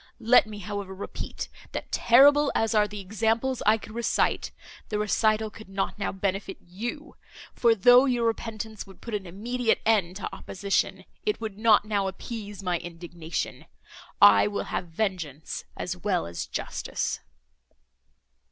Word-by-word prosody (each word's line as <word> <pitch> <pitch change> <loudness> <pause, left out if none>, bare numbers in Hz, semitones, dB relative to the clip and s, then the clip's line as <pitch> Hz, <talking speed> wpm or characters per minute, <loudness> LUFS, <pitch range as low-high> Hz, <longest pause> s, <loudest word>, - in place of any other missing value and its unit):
Let 235 -1 +5
me, 215 -1 -8
however, 205 -1 -5
repeat, 195 - -6 0.3
that - - -5
terrible 280 +4 +6
as 225 +1 +1
are 210 -1 +4
the 210 0 -7
examples 225 +6 0
I 215 +1 +6
could 215 0 -11
recite, 235 0 0 0.4
the 210 - -1
recital 215 +1 +1
could 220 -3 -13
not 195 +1 -2
now 200 - -1
benefit 195 0 -3
you; 235 - -7 0.4
for, 235 -2 +4
though 245 +5 +7
your 245 -3 +1
repentance 220 -2 -3
would 195 - -15
put 235 - -8
an 200 -3 -3
immediate 230 +6 0
end 200 -5 +2
to 195 - -5
opposition, 195 +1 -1 0.2
it 420 -1 0
would 215 -2 -6
not 220 -2 +5
now 205 -2 0
appease 205 0 -7
my 180 -2 0
indignation.—I 165 - 0
will 205 -1 -2
have 180 - -2
vengeance 165 -5 -3
as 180 - -3
well 180 -1 -1
as 85 0 -5
justice." - - -3
210 Hz, 145 wpm, -27 LUFS, 190-225 Hz, 0.4 s, though